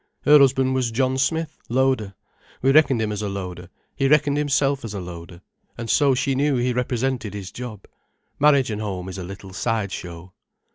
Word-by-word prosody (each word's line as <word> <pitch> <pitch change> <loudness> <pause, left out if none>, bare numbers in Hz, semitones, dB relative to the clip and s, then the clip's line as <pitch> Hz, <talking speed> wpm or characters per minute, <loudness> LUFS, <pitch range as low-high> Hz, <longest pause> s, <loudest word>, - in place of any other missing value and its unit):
"Her 150 0 +7
husband 130 -1 +3
was 130 -2 0
John 130 +3 0
Smith, 160 +3 -1
loader. 125 -5 +1 0.5
We 135 - +5
reckoned 135 -4 +4
him 110 -1 -1
as 105 0 -3
a 105 - -2
loader, 90 -3 -6 0.3
he 135 - +1
reckoned 145 0 +3
himself 140 -1 +1
as 110 -3 -6
a - - -3
loader, 85 -1 -9 0.4
and 115 -2 -3
so 140 -3 +4
she 135 +2 0
knew 140 +1 +1
he 125 0 0
represented 125 -3 -2
his 95 -3 -7
job. 115 -5 -8 0.5
Marriage 140 -4 +4
and 105 0 -3
home 95 -3 -4
is 95 0 -7
a - - -5
little 95 +1 -9
side 110 -1 -1
show. 90 0 -8
120 Hz, 190 wpm, -23 LUFS, 100-135 Hz, 0.5 s, Her